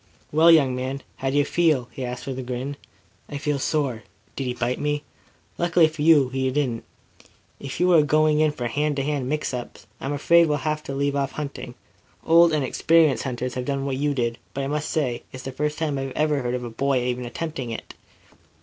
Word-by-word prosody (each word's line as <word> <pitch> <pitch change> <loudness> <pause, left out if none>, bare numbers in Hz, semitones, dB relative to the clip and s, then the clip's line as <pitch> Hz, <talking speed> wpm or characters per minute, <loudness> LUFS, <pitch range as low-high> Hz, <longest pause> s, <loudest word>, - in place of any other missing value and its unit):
"Well, 160 +3 +5
young 140 -6 +5
man, 130 +2 -4
how 135 - -1
do 140 - 0
you 145 - +4
feel?" 150 -6 +2
he 130 - -6
asked, 125 0 -5
with 130 -1 -4
a - - -2
grin. 130 +3 -4 0.5
"I 145 - -4
feel 145 0 -1
sore. 135 -6 -1 0.3
Did 135 - -3
he 125 - -1
bite 125 +1 -1
me?" 150 0 -1 0.6
"Luckily 175 -1 +4
for 155 -1 -7
you, 150 -4 +5
he 130 0 -1
didn't. 130 -4 -1 0.7
If 140 - -6
you 180 0 +4
are 160 - +7
going 155 +1 +3
in 155 -1 +3
for 125 -4 -5
hand 145 +5 0
to 135 - -1
hand 140 -3 -2
mix 150 -2 -2
ups 125 -1 -7
I'm 135 - -3
afraid 170 +4 +4
we 150 - +1
shall 140 - -5
have 155 0 -1
to 135 - -4
leave 140 0 0
off 140 -1 -1
hunting. 145 -2 -6 0.5
Old 170 +1 +6
and 155 -3 +1
experienced 160 +3 +3
hunters 125 -1 -3
have 125 -1 -4
done 140 0 -2
what 135 -2 -2
you 145 +1 0
did, 120 -2 -1 0.2
but 140 - -2
I - - -2
must 150 +1 -2
say 130 -7 -1
it's 130 0 -9
the 135 - -5
first 150 +3 -2
time 150 -4 -1
I 135 - -3
ever 150 -2 +1
heard 125 0 -1
of 125 - -4
a 120 - -6
boy 135 +2 0
even 125 0 -2
attempting 135 +1 -5
it." 115 - -7
140 Hz, 225 wpm, -24 LUFS, 130-150 Hz, 0.7 s, are